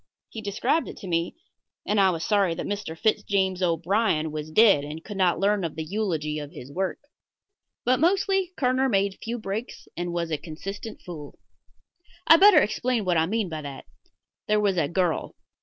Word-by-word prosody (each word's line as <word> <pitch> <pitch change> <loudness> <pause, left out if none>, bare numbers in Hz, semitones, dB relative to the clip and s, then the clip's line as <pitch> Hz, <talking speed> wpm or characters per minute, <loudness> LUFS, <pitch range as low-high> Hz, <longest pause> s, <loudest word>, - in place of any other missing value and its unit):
He 225 - -7
described 210 +10 0
it - - -8
to 195 - -9
me, 170 -1 -1 0.5
and 210 - +1
I 195 -1 +5
was 165 -2 -2
sorry 200 -5 +2
that - - -4
Mr. 200 -6 -4
Fitz 215 +5 +1
James 190 -2 0
O'Brien 170 -1 +1
was 155 0 -5
dead 195 -4 +5
and 155 +3 -7
could 210 - -8
not 180 -2 +3
learn 200 0 +2
of 165 - -3
the 160 - -3
eulogy 155 -5 -2
of 145 -1 -7
his 130 +3 -10
work. 185 +4 -2 0.9
But 255 +1 +3
mostly 385 +2 +2
Kerner 260 0 +2
made 195 -3 0
few 235 +2 -3
breaks 215 +2 -6
and 175 0 -3
was 170 -1 -2
a 155 - -1
consistent 195 +7 -8
fool. 155 -5 -9 0.9
I'd 325 - +8
better 390 -5 +8
explain 235 0 -1
what 180 -2 +2
I 160 0 +2
mean 220 +1 -1
by 160 -2 -5
that. 140 -2 -8 0.6
There 210 0 +3
was 200 -2 +2
a 165 -5 +1
girl. 175 0 -1
190 Hz, 190 wpm, -25 LUFS, 165-220 Hz, 0.9 s, I'd